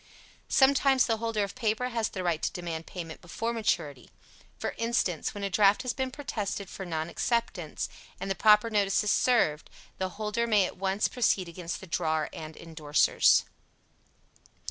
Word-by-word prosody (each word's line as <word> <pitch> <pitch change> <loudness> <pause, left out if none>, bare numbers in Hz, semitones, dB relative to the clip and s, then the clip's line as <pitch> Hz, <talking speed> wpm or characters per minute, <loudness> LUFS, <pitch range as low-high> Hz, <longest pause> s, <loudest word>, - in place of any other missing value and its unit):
Sometimes 270 -1 +4
the 225 -2 0
holder 225 -2 -1
of 200 - -4
paper 240 0 -1
has 230 -3 -1
the 185 - -5
right 170 -3 0
to - - -1
demand 165 -2 -5
payment 165 -3 -7
before 225 +7 -3
maturity; 170 - -2 0.5
for - - -3
instance, 230 -9 0
when 205 - -5
a 200 - 0
draft 205 +4 +4
has 250 -1 -1
been 260 -1 -2
protested 215 -8 -4
for 190 - -7
non 160 -1 -2
acceptance 195 -5 -2 0.3
and 195 - -4
the 195 - +1
proper 210 +2 +5
notices 205 0 +2
served, 195 -12 +2 0.3
the 190 0 -1
holder 220 +2 -1
may 210 -4 +4
at - - -7
once 195 +2 +1
proceed 205 -7 +1
against 170 0 -6
the - - -8
drawer 160 -3 -1
and 155 0 -8
indorsers. 155 -3 +3
200 Hz, 165 wpm, -28 LUFS, 170-230 Hz, 0.5 s, proper